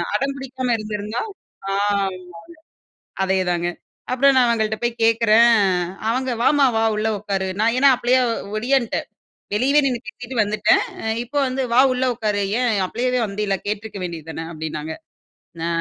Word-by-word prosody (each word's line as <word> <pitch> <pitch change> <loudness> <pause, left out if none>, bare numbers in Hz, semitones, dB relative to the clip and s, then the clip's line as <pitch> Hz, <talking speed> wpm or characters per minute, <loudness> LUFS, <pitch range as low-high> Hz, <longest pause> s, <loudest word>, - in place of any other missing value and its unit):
அடம்பிடிக்காம 265 0 -2
இருந்திருந்தா 215 +1 -4 0.5
ஆமாங்க, 200 -1 0 1.1
அதேதாங்க. 180 -2 0 0.4
அப்றம் 270 +2 +4
நான் 255 -2 +5
அவங்கள்ட்ட 220 -1 0
போய் 235 -1 -1
கேட்கிறேன், 230 +1 +5 0.6
அவங்க 255 +2 -1
"வாம்மா 290 0 +4
வா! 225 - +2
உள்ளே 215 +1 0
உட்காரு". 195 -2 -2
நான் 225 +2 +3
ஏன்னா 275 +2 +5
அப்ளையே 255 +1 +3 0.4
ஒடியான்ட்டேன். 245 +1 0 0.5
வெளியவே 265 +7 +3
நின்னு 250 -3 0
பேசிட்டு 245 +1 -8
வந்துட்டேன். 210 0 +2 0.4
இப்போ 260 +5 -6
வந்து, 260 +1 -2
வா 240 - +4
உள்ள 255 - -1
உட்காரு. 215 -3 -1 0.2
ஏன் 250 -1 +2 0.2
அப்ளையவே 250 +5 -1
வந்தீல்ல, 200 -1 -2
கேட்ருக்க 210 0 -4
வேண்டியதானே 165 -2 -6
அப்டின்னாங்க. 155 -1 -5 0.7
அ, - - -1
225 Hz, 130 wpm, -21 LUFS, 205-250 Hz, 1.1 s, நான்